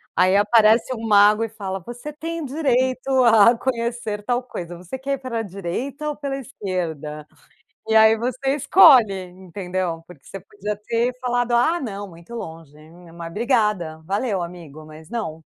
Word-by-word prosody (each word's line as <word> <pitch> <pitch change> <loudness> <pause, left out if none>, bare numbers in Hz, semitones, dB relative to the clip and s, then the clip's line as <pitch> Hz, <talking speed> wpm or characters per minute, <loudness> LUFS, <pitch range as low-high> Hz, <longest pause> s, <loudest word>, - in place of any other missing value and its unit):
Aí 185 +2 +4
aparece 220 +3 +4
um 225 -1 -6
mago 210 +1 +5
e 225 - -3
fala: 195 -3 -5
"Você 245 +5 -7
tem 330 +1 -5
direito 260 -2 0
a 230 0 +6
conhecer 235 -4 -3
tal 245 +3 -1
coisa. 175 -8 -7
Você 180 +8 -7
quer 275 +1 -2
ir - - -1
pela 255 -4 -4
direita 220 - -5
ou 300 - -4
pela 280 -2 -4
esquerda?" 170 - -5 0.6
E 220 - +1
aí 220 0 +6
você 255 +4 -1
escolhe, 270 - +6 0.2
entendeu? 180 -2 -5
Porque 170 -6 -15
você 195 - -8
podia 210 - -6
ter 235 +2 +1
falado: 245 -1 -1
"Ah, 280 +9 +2
não 205 -5 -6
muito 170 +6 -13
longe, 165 -8 -8
né, 165 +3 -16
mas 170 0 -8
obrigada, 210 - 0
valeu 200 +1 -1
amigo, 165 -3 -9
mas 155 +1 -13
não". 190 -9 -5
220 Hz, 160 wpm, -22 LUFS, 180-250 Hz, 0.6 s, a